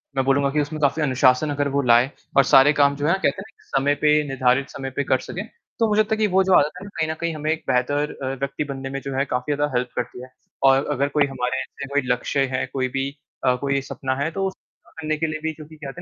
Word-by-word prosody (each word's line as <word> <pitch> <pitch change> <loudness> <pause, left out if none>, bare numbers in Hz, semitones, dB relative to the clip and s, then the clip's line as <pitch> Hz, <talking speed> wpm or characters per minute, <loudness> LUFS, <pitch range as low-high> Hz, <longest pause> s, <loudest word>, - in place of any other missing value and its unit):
मैं 135 -1 +1
बोलूँगा 140 +1 +3
कि 150 +1 +1
उसमें 150 +2 -4
काफ़ी 140 +2 +2
अनुशासन 130 +1 +3
अगर 145 0 0
वो - - +3
लाए 125 +1 +4 0.3
और 140 - +8
सारे 135 +3 +6
काम 140 -1 +3
जो 145 +1 -2
हैं 170 - +4
कहते 195 0 0
हैं 210 +3 -13
ना - - -27
समय 140 +1 +2
पे 150 0 +5
निर्धारित 135 0 +1
समय 135 -1 -6
पे 140 - 0
कर - - +2
सके, - - -6 0.4
तो 225 - +3
मुझे 210 +1 +4
लगता 215 +1 0
है - - -9
कि 215 -1 +2
वो 190 0 +3
जो 190 0 +2
आदत 150 +1 +1
है - - -10
ना, - - -9
कहीं 155 - 0
न - - -1
कहीं 170 -1 -1
हमें 155 +1 -1
एक 160 - -2
बेहतर 145 +4 +1
अ, 130 0 -2
व्यक्ति 140 +2 -2
बनने 135 0 -6
में 135 0 -4
जो 135 - -5
है 135 - +2
काफ़ी 125 +2 -2
ज़्यादा 145 +1 -1
हेल्प 125 0 -1
करती 125 - -4
है 130 - -11 0.4
और 135 +1 +3
अगर 140 0 +1
कोई 145 - +5
हमारे 130 -1 -2
ऐसे 135 +1 -8
कोई 145 - +3
लक्ष्य 135 +3 0
हैं 130 - -1
कोई 130 -1 0
भी 135 +1 -1 0.4
अ, 125 -1 +4
कोई 140 +2 -1
एक 135 - -2
सपना 130 -1 -3
है 155 - -1
तो 195 +2 -1
उसको 190 - -7 0.4
पाने 155 0 -1
के 160 +1 -1
लिए 155 0 -4
भी 160 - 0
क्योंकि 155 0 -12
कहते 150 +2 -8
140 Hz, 275 wpm, -22 LUFS, 135-155 Hz, 0.4 s, और